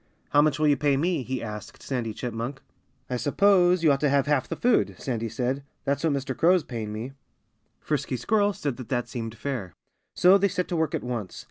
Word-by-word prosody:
"How 145 - +6
much 150 -2 +2
will 155 0 +2
you 145 -1 +4
pay 145 -2 +2
me?" 165 +1 0
he 130 0 -4
asked 105 -1 -8
Sandy 120 -4 -2
Chipmunk. 120 +4 -4 0.5
"I 125 - -2
suppose 180 +4 +3
you 155 - +6
ought 135 - +2
to 145 - +2
have 140 -1 +3
half 145 -3 +1
the - - -2
food," 245 -1 +2
Sandy 115 -4 -3
said. 125 +5 -2 0.2
"That's 140 +2 -1
what 160 -3 +2
Mr. 135 -1 -3
Crow 175 +3 +5
is 180 - +1
paying 110 -4 -5
me." 110 +5 -5 0.7
Frisky 140 -3 -2
Squirrel 205 - +2
said 145 -9 -3
that 125 - -9
that 120 -2 -1
seemed 115 -2 -5
fair. 110 -9 -4 0.4
So 190 +2 +6
they 200 - +3
set 180 -1 -2
to 175 - -1
work 160 -2 0
at - - -3
once. 120 -6 -4
140 Hz, 220 wpm, -26 LUFS, 120-160 Hz, 0.7 s, How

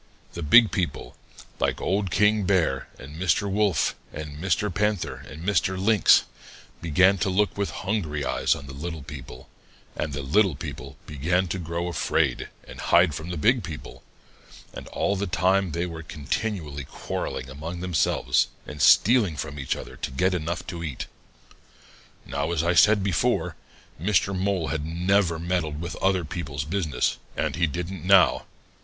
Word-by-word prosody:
The 85 - -6
big 105 +9 +6
people, 85 -9 -3 0.4
like - - 0
Old 100 +1 0
King 105 +2 +3
Bear 95 -3 +1
and 70 +3 -11
Mr. 95 +3 +1
Wolf 100 -4 +1 0.2
and 75 -1 -7
Mr. 95 +3 0
Panther 105 0 -1
and 75 +4 -9
Mr. 95 -1 +1
Lynx, 105 +2 +5 0.6
began 90 +4 +4
to 100 - +1
look 100 +2 +1
with 100 -1 -1
hungry 80 -9 -2
eyes - - +1
on 70 - -9
the 70 - -9
little 80 +1 -6
people, 65 -3 -10 0.5
and 75 - -3
the 70 0 -4
little 90 +4 +3
people - - -8
began 85 +6 0
to 95 - -2
grow 85 +1 -3
afraid 85 -4 0 0.2
and - - -11
hide 85 -2 +4
from 80 +3 -6
the 90 - -4
big 120 - +3
people, 75 -4 -8 0.7
and - - -8
all 100 - -1
the 100 +1 -2
time 95 +1 +2
they 85 +3 -1
were 85 -2 -6
continually 75 - -4
quarreling 65 - -5
among 80 +6 -7
themselves 90 -3 +1 0.2
and 75 0 -7
stealing 105 - +5
from 75 -1 -5
each 65 - -1
other - - -9
to - - -4
get 90 +8 +1
enough 85 0 -3
to 85 -2 -6
eat. 75 -6 -4 1.2
"Now, 70 +3 -2
as 80 -2 0
I 85 +1 +2
said 105 +3 +5
before, 95 -4 0 0.5
Mr. 95 0 +2
Mole 95 -3 -1
never 85 +2 +1
had 80 - -7
meddled 80 -5 -1
with 85 +1 -5
other 95 -3 +1
people's 75 -4 -4
business, 80 -2 -1 0.2
and - - -1
he 85 -1 +2
didn't 85 +3 -5
now. 95 0 +5
85 Hz, 160 wpm, -25 LUFS, 75-95 Hz, 1.2 s, big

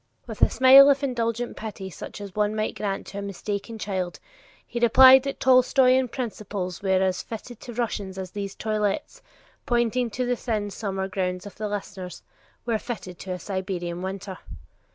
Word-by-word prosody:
With - - -8
a - - +6
smile 270 +2 +8
of 280 0 +2
indulgent 240 -2 -1
pity 200 -3 -7
such 205 - -9
as 200 -2 -8
one 210 +1 0
might 215 0 -1
grant 195 -2 -3
to 200 - -7
a - - -4
mistaken 200 +3 -5
child, 190 -4 -3 0.5
he 235 - -4
replied 260 +3 +8
that 275 +1 -4
such - - -40
Tolstoyan 255 0 +5
principles 210 -7 -5
were 190 -1 +2
as 185 -1 0
fitted 230 +1 -8
to 240 - -9
Russia 225 -3 -2
as 185 -1 -6
"these 200 -1 -5
toilettes," 210 -2 -2 0.5
pointing 240 0 +1
to 250 +4 -2
the 245 0 +1
thin 215 -4 -2
summer 195 -2 -3
gowns 185 -1 -3
of 205 - -9
his - - -15
listeners, 190 -3 -6 0.4
"were 230 -2 0
fitted 190 -8 -7
to 185 - -5
a - - -4
Siberian 180 -2 -4
winter." 190 0 -5
210 Hz, 175 wpm, -25 LUFS, 190-240 Hz, 0.5 s, smile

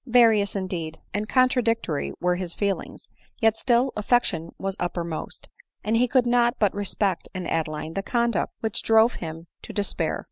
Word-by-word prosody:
Various, 225 -5 +4
indeed, 175 -5 -4
and 210 +2 -2
contradictory 230 - +1
were 180 0 +2
his 180 -2 -4
feelings; 200 -2 -3 0.3
yet 225 -2 +4
still 245 +3 +2
affection 200 -6 +1
was 195 0 -3
uppermost; 170 -2 -4 0.4
and 220 +2 +1
he 245 +2 +3
could 250 0 +3
not 240 0 +3
but 205 -3 +2
respect 200 -2 -1
in 185 -1 -4
Adeline 160 -1 -2
the 195 - -2
conduct 235 -2 0
which 220 -2 0
drove 225 +1 +4
him 165 0 -6 0.2
to - - -9
de 205 - 0
spair. 165 -4 -1
205 Hz, 165 wpm, -25 LUFS, 175-235 Hz, 0.4 s, Various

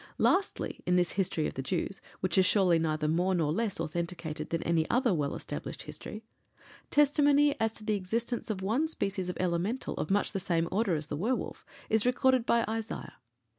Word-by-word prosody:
Lastly, 385 +1 +1
in 180 - +3
this 180 -1 +3
history 180 -5 0
of - - -2
the 135 - -4
Jews, 185 +6 -2 0.2
which 185 -2 0
is 190 - +6
surely 185 -3 +4
neither 155 -1 0
more 180 +4 +2
nor 155 -3 +1
less 220 -1 -1
authenticated 165 -1 -4
than 165 - -1
any 165 -1 +1
other 245 -3 +3
well 145 -4 -1
established - - -6
history, 215 +1 -8 0.7
testimony 290 0 +4
as 225 0 +1
to 215 - -8
the 215 - 0
existence 230 +6 -2
of 195 -3 -3
one 240 +11 +1
species 195 - -2
of 180 - -4
Elemental 185 +7 -1
of - - -2
much 200 +1 +1
the 195 - -2
same 170 -3 0
order 200 -3 +1
as 150 -1 -2
the 145 - -4
werwolf 230 - -2 0.2
is 220 -1 +2
recorded 255 -1 +3
by 235 0 +3
Isaiah. 225 +1 -4
190 Hz, 190 wpm, -30 LUFS, 170-230 Hz, 0.7 s, is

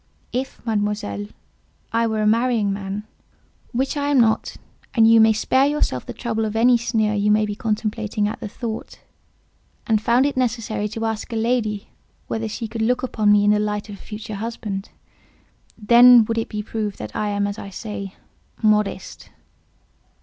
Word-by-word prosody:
If, 255 -1 -4
Mademoiselle, 205 - -2 0.7
I 230 0 +2
were 220 -1 -1
a - - +1
marrying 225 -2 +2
man 195 +1 -5 0.7
(which 265 +5 -1
I 285 -1 -1
am 285 -2 +3
not; 220 -2 +2 0.4
and 225 -2 +6
you 225 0 +7
may 220 0 +6
spare 260 +5 +2
yourself 290 - -1
the - - -4
trouble 225 -3 -2
of 215 0 -3
any 240 +2 +5
sneer 225 -2 0
you 205 0 +1
may 215 0 +4
be 210 - -3
contemplating 215 -1 -1
at 210 - -5
the - - -5
thought), 225 +1 -6 0.9
and 220 -3 +2
found 240 +4 +3
it 285 - -1
necessary 230 -4 -1
to 225 +2 -4
ask 220 +1 -3
a - - -3
lady 220 -3 -1 0.4
whether 225 0 -2
she 225 +2 -5
could 225 +1 -5
look 245 +3 +1
upon 215 -4 +2
me 205 0 +5
in 205 - +5
the 210 - +3
light 210 0 -2
of 205 - -7
a - - -22
future 215 0 -8
husband, 215 -4 -5 0.9
then 235 +2 +7
would 230 +1 -1
it 225 - -4
be 210 -1 -4
proved 210 -2 -4
that 105 - -8
I 210 - -1
am 205 0 0
as 205 +1 -4
I 200 - -7
say—modest." 210 +1 -3
220 Hz, 180 wpm, -22 LUFS, 210-235 Hz, 0.9 s, you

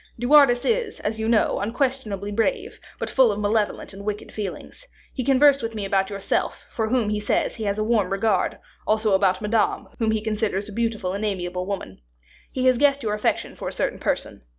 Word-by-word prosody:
De 240 - -4
Wardes 270 -3 +6
is, 465 -1 0
as 220 +1 -3
you 220 +1 -1
know, 230 -2 +2
unquestionably 215 -3 -2
brave, 395 - -1 0.2
but - - -3
full 260 -4 +4
of 205 - -3
malevolent 210 -1 -1
and 200 +1 -9
wicked 210 0 -4
feelings. 210 - -7 0.3
He 255 - -3
conversed 275 +2 +5
with 225 0 -4
me 205 -2 -3
about 195 -1 +1
yourself, 200 -1 -2
for 220 -2 -1
whom, 230 -2 +1
he 210 0 0
says, 210 - 0
he 220 - -4
has 200 0 -1
a 215 - 0
warm 215 -4 +1
regard, 195 +3 +1 0.3
also 215 -1 +2
about 190 0 +2
Madame, 215 +1 0
whom 225 -2 +1
he 220 -1 +1
considers 215 -2 -1
a - - -8
beautiful 220 -5 -1
and 200 +2 -3
amiable 180 -3 -2
woman. 190 - -5 0.5
He 255 -1 -2
has 255 -2 +4
guessed 280 -1 +3
your 210 -2 -1
affection 210 - -1
for - - -6
a - - -3
certain - - -2
person. - - -2
215 Hz, 205 wpm, -23 LUFS, 200-245 Hz, 0.5 s, Wardes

